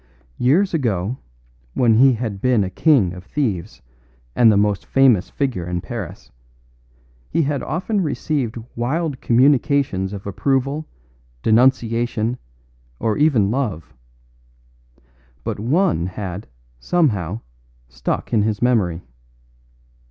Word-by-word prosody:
Years 170 +11 +3
ago, 115 - -1 0.6
when 120 -3 +4
he 130 +4 +6
had 110 -4 -4
been 125 -5 +3
a 95 - -4
king 120 - +3
of 90 -1 -10
thieves 105 - -3 0.5
and 115 -2 +6
the 100 - +3
most 105 -1 +1
famous 130 -8 +3
figure 120 -12 -2
in 90 0 -2
Paris, 85 - -7 1.0
he 165 - +1
had 140 -2 -1
often 195 +5 -2
received 145 -6 -2 0.2
wild 140 +4 -2
communications 130 -5 +2
of 100 -1 -7
approval, 135 +8 -1 0.6
denunciation, 120 0 +2 0.6
or 110 -2 0
even 125 -10 +3
love; 110 - -3 1.5
but - - -4
one 115 - +1
had, 95 +1 -6 0.3
somehow, 105 - 0 0.5
stuck - - -4
in 110 - +4
his 105 0 0
memory. 100 -9 +1
120 Hz, 110 wpm, -20 LUFS, 100-140 Hz, 1.5 s, he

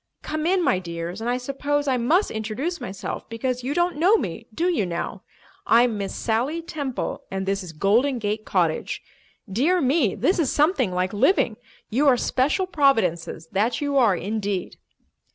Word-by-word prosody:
Come 310 +1 -2
in, 370 0 +2
my 185 - +2
dears, 170 +2 -5
and 235 - -2
I 245 - +1
suppose 285 +3 -2
I 260 -2 +2
must 315 - +2
introduce 230 +11 -3
myself 190 0 -6
because 245 +2 -2
you 270 +3 -2
don't 345 -2 +1
know 370 +8 +5
me, 225 - -5
do 330 +11 0
you 340 - +1
now? 170 -2 -4 0.5
I'm 235 0 +4
Miss 200 -1 -4
Sally 260 +9 -1
Temple, 285 -6 -4
and 190 0 -3
this 195 +1 -1
is 180 -3 -8
Golden 225 - +2
Gate 215 -1 -2
Cottage. 170 -6 -1 0.4
Dear 280 - +2
me, 270 - +2
this 365 - +1
is 305 - +2
something 290 - +2
like 180 +2 -1
living. 235 - +3 0.4
You 275 +7 +2
are 255 -3 +6
special 275 +11 +1
providences, 205 - +1
that 215 +5 +1
you 285 -1 -1
are, 235 -8 +5
indeed!" 200 -1 -3
245 Hz, 170 wpm, -24 LUFS, 200-290 Hz, 0.5 s, are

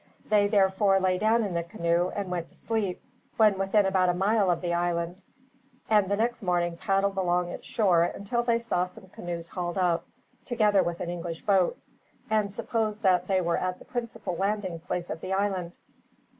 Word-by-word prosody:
They 205 -1 +3
therefore 195 -1 +3
lay 185 -1 +1
down 225 +2 +3
in 200 -4 -3
the 170 - 0
canoe 170 +1 0
and 200 -3 -3
went 170 -2 -3
to - - -17
sleep, 215 -5 -2 0.3
when 210 -3 +4
within 195 +1 +3
about 190 -1 +2
a 175 - +1
mile 200 +1 +2
of 175 -1 +2
the 175 -1 -1
island; 175 +1 -1 0.7
and 210 -3 +4
the 200 - +2
next 235 +2 0
morning 175 -2 0
paddled 195 +2 0
along 180 -1 +1
its - - -8
shore 185 -7 +3
until 200 +7 -2
they 235 -1 +2
saw 230 -6 0
some 190 +1 -13
canoes 170 -2 -6
hauled 175 0 -4
up, 175 -2 +1 0.4
together 210 -5 +3
with 175 -1 -3
an 175 - -3
English 170 -1 -5
boat, 190 -3 +2 0.5
and 210 -2 +2
supposed 220 0 -2
that 180 -2 +3
they 190 -1 +2
were 170 -1 0
at 185 0 -2
the - - -15
principal 235 -7 -4
landing 195 -2 -1
place 175 +1 -4
of - - -5
the 185 - -3
island. 190 -3 -1
190 Hz, 190 wpm, -27 LUFS, 175-205 Hz, 0.7 s, when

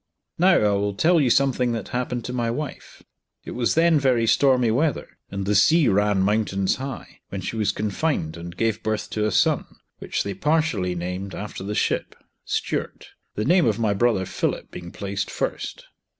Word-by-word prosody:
Now 180 +1 +5
I 105 -8 +3
will 100 0 0
tell 165 - +4
you 130 - +2
something 125 -2 +2
that 115 -4 -4
happened 125 -1 -3
to 125 - -4
my 120 -2 -1
wife. 140 +4 -6 0.4
It - - -6
was 120 -1 0
then 165 -1 +4
very 125 -4 +2
stormy 125 -1 +3
weather, 145 +4 -1
and 100 -1 -4
the 105 - +1
sea 155 - +5
ran 100 -1 +2
mountains 100 -2 +1
high, 135 0 -7
when 100 - -5
she 95 - -4
was 105 -3 +1
confined 105 - -2
and 85 +1 -9
gave 115 -1 0
birth 110 -1 -2
to 105 0 0
a - - -1
son, 90 - +2 0.3
which - - -2
they 100 - -3
partially 150 - 0
named 90 +3 -4
after 105 -2 -6
the 105 +2 -4
ship, - - -1 0.3
Stuart; - - -3 0.3
the 105 - -1
name 175 0 +4
of 110 -2 +1
my 110 -3 +1
brother 100 -2 +1
Philip, - - -3
being 85 -1 -8
placed 100 0 -4
first. - - -4
110 Hz, 185 wpm, -23 LUFS, 100-130 Hz, 0.4 s, Now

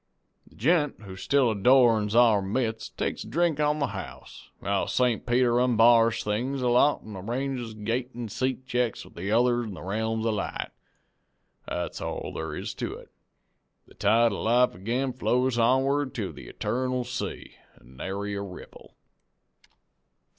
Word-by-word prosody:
The - - -21
gent 150 -1 +1
who 95 -2 -9
still 130 +5 +2
adorns 110 -1 +4
our 115 -4 +5
midst 110 +2 -3
takes - - -2
a - - -11
drink 160 +4 +1
on 150 0 +2
the 140 - -1
house, - - -9
while 100 0 -1
St. 125 -3 +1
Peter 120 0 +3
onbars 115 -1 +4
things 125 +6 -2
a 125 - +2
lot 125 +4 +3
an' 105 -2 -9
arranges 120 +3 -4
gate 115 +4 -2
an' 120 -1 -5
seat 130 +4 -2
checks 125 -3 -1
with - - -16
the 95 +4 -4
other 120 +1 +3
in 105 -4 -6
the - - -9
realms 110 +3 -2
of 115 - +1
light. 100 - -4 1.0
That's 90 -1 -4
all - - -4
thar 80 -1 -4
is - - -5
to - - -4
it. - - -14 0.7
The - - -19
tide 115 +3 +3
of 100 - -4
life 120 +3 +3
ag'in 120 +8 -2
flows 125 0 +1
onward 135 +4 +2
to 105 -5 -3
the - - -11
eternal 125 0 -2
sea, 125 +1 -5 0.2
an' 65 +1 -19
nary 100 +5 -4
ripple. 95 -3 -10
120 Hz, 160 wpm, -27 LUFS, 105-130 Hz, 1.0 s, our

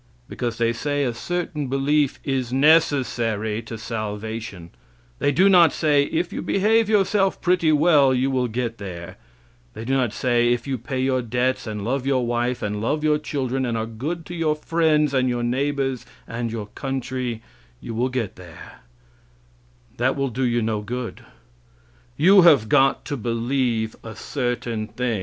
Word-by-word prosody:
Because 120 -2 -4
they 115 0 +1
say 145 +4 -1
a 125 -3 -1
certain 165 +2 -3
belief 140 +2 +1
is 130 -3 -2
necessary 125 -7 +2
to 115 0 -8
salvation. 110 -4 -5 0.5
They 145 - +2
do 185 +7 +4
not 175 -4 +6
say, 145 -3 +2
if 170 +4 -2
you - - -3
behave 215 +2 +2
yourself 195 -2 +2
pretty 175 -3 +2
well 150 -3 +5
you 130 +1 +1
will 130 -1 +1
get 115 0 -3
there; 90 -4 -8 0.6
they 110 - -7
do 130 - -1
not 130 -5 +1
say, 120 0 +1
if 120 -1 -1
you 135 -3 -3
pay 130 +3 -4
your 130 0 +1
debts 125 +2 -1
and 105 -2 -4
love 130 +2 -1
your 130 -3 +1
wife, 120 +1 -1
and 105 0 -2
love 150 +7 -1
your 150 -1 +2
children, 135 -3 -2
and 120 -2 -1
are 110 - -2
good 145 +10 -5
to 175 - -8
your 160 -3 0
friends, 155 -2 +1
and 130 -1 +2
your 120 -1 -1
neighbors, 135 +1 -1 0.2
and 115 0 -4
your 110 -2 -4
country, 130 -3 -4 0.4
you 115 - -7
will 120 +3 0
get 120 -6 -3
there; 90 -4 -12 1.2
that 125 +3 +1
will 140 -1 -1
do 125 +3 -3
you 120 -1 +1
no 110 -1 -1
good; 120 +3 -6 0.9
you 190 +5 +7
have 145 -10 +6
got 135 +3 +3
to 145 - -3
believe 115 -1 -1
a 110 -1 -8
certain 120 -5 -3
thing. 120 -3 -2
130 Hz, 170 wpm, -23 LUFS, 115-145 Hz, 1.2 s, you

